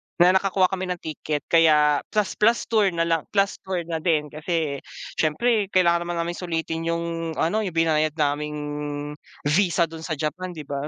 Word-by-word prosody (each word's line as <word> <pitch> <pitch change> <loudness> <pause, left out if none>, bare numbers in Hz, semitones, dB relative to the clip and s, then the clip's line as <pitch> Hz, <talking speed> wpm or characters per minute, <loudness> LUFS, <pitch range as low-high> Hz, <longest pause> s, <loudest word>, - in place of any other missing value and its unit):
na 175 +1 +6
nakakuha 190 0 +2
kami 190 -1 -3
ng 180 - -1
ticket 150 -1 -3
kaya 150 -3 +5
plus 210 -2 -1
plus 230 +2 +4
tour 215 -3 +4
na 165 - +2
lang. 165 -2 0
Plus 195 0 +2
tour 185 -2 -3
na 165 -1 -3
din 155 -3 0
kasi 155 -2 -2 0.4
syempre 205 +7 +2
kailangan 170 -1 +3
naman 175 - -2
naming 175 +1 -4
sulitin 165 -2 -3
yung, 165 -1 -2
ano 175 +7 +1
yung 190 -6 -3
binayad 155 -2 +2
naming 150 -1 -1 0.9
visa 170 +2 +3
dun 165 -1 -5
sa 160 - -2
Japan, 170 +5 -4
di 155 - -7
ba? 140 0 -4
165 Hz, 175 wpm, -24 LUFS, 155-185 Hz, 0.9 s, na